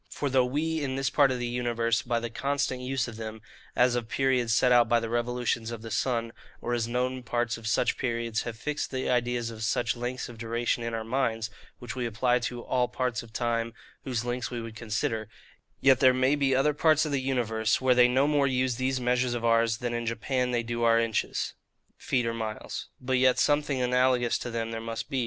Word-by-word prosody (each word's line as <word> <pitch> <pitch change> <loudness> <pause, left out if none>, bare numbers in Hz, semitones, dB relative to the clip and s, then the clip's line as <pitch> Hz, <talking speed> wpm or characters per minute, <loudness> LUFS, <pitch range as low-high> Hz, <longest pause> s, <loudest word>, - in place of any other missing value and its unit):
For, 140 -2 -3
though 130 -1 +4
we 155 +5 -1
in 130 -2 -2
this 135 0 0
part 140 -2 +5
of 130 - -1
the 120 - -3
universe, 120 -1 0
by 120 -1 -1
the 115 0 -5
constant 140 0 -1
use 130 -1 -1
of 115 -2 -8
them, 110 0 -6 0.4
as 125 0 +4
of 120 -2 -2
periods 130 -3 +1
set 125 +3 +4
out 120 -2 +5
by 120 - +4
the 115 0 -5
revolutions 120 -1 -1
of 115 -1 -7
the 115 - -7
sun, 115 -1 -1 0.3
or 120 - -3
as 115 -1 0
known 125 +2 -1
parts 120 -1 -1
of 115 -1 -8
such 115 +1 +1
periods, 115 -3 -1
have 115 -2 -6
fixed 150 +5 -3
the 130 -1 -2
ideas 120 -1 0
of 110 -1 -9
such 120 +2 0
lengths 120 +1 -4
of 120 -2 -11
duration 120 +1 -1
in 115 0 -3
our 110 - -3
minds, 115 -2 -1 0.3
which 120 0 -7
we 125 -2 -1
apply 120 +2 +1
to 120 0 -4
all 125 -1 +1
parts 125 -3 -2
of 115 - -14
time 115 0 -1 0.3
whose 120 -3 -2
lengths 125 0 -2
we 120 - -4
would 115 -1 -7
consider; 110 0 -2 0.5
yet 135 -2 +5
there 130 -1 +6
may 130 +2 +3
be 135 -2 +2
other 150 +3 +3
parts 155 +1 +3
of 150 - -3
the 140 -2 0
universe, 115 -4 0
where 130 -1 +4
they 125 0 +6
no 130 +3 +3
more 145 -2 +3
use 130 -2 0
these 130 0 0
measures 125 0 +1
of 120 -1 -3
ours, 115 -1 +3
than 120 -1 -3
in 120 0 -3
Japan 125 +3 -1
they 120 -1 0
do 120 0 -3
our 115 0 +5
inches, 115 -2 -1 0.4
feet, 125 -2 -1
or 115 - -1
miles; 110 -2 -5
but 130 0 0
yet 130 0 +4
something 145 -2 +2
analogous 125 -1 +2
to 120 - -5
them 115 -1 -3
there 115 0 -4
must 115 +3 -5
be. 135 - 0
120 Hz, 225 wpm, -28 LUFS, 115-130 Hz, 0.5 s, there